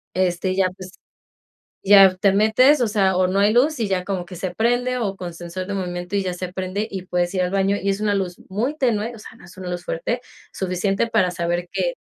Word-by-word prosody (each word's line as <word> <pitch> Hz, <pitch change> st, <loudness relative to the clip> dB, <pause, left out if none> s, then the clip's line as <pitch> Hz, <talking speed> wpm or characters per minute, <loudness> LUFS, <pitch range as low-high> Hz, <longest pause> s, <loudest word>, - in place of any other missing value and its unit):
Este, 185 Hz, 0 st, 0 dB
y 185 Hz, -, -3 dB
ya, 190 Hz, -1 st, +3 dB
pues, 185 Hz, -1 st, -9 dB, 0.9 s
ya 195 Hz, -1 st, +7 dB
te 195 Hz, +1 st, +3 dB
metes, 245 Hz, +7 st, +4 dB
o 230 Hz, -, +2 dB
sea, 195 Hz, -3 st, +2 dB
o 185 Hz, -, +3 dB
no 185 Hz, +2 st, 0 dB
hay 205 Hz, +2 st, +3 dB
luz 285 Hz, +2 st, +3 dB
y 215 Hz, -, 0 dB
ya 185 Hz, -2 st, -1 dB
como 185 Hz, -2 st, -3 dB
que 180 Hz, 0 st, -10 dB
se 180 Hz, +1 st, -4 dB
prende 245 Hz, +2 st, +1 dB
o 200 Hz, -4 st, -2 dB
con 175 Hz, -2 st, -6 dB
sensor 175 Hz, +2 st, -6 dB
de 200 Hz, -, -5 dB
movimiento 180 Hz, -1 st, -4 dB
y 195 Hz, -, +1 dB
ya 180 Hz, -1 st, -3 dB
se 180 Hz, 0 st, -6 dB
prende 190 Hz, +3 st, -3 dB
y 185 Hz, -1 st, -6 dB
puedes 175 Hz, 0 st, -1 dB
ir 185 Hz, -, -1 dB
al 180 Hz, -, -1 dB
baño 195 Hz, +1 st, +1 dB
y 200 Hz, -, -2 dB
es 195 Hz, +1 st, 0 dB
una 210 Hz, -1 st, +1 dB
luz 185 Hz, -3 st, -2 dB
muy 240 Hz, +10 st, -1 dB
tenue, 235 Hz, -4 st, 0 dB
o 230 Hz, -, -11 dB
sea, -, -, -11 dB
no -, -, -15 dB
es 175 Hz, -, -16 dB
una 185 Hz, -1 st, -7 dB
luz 175 Hz, 0 st, -5 dB
fuerte, 235 Hz, +9 st, -2 dB, 0.3 s
suficiente, 195 Hz, +4 st, -1 dB
para 215 Hz, -6 st, +2 dB
saber 175 Hz, 0 st, -2 dB
que, -, -, -1 dB
195 Hz, 250 wpm, -22 LUFS, 180-215 Hz, 0.9 s, ya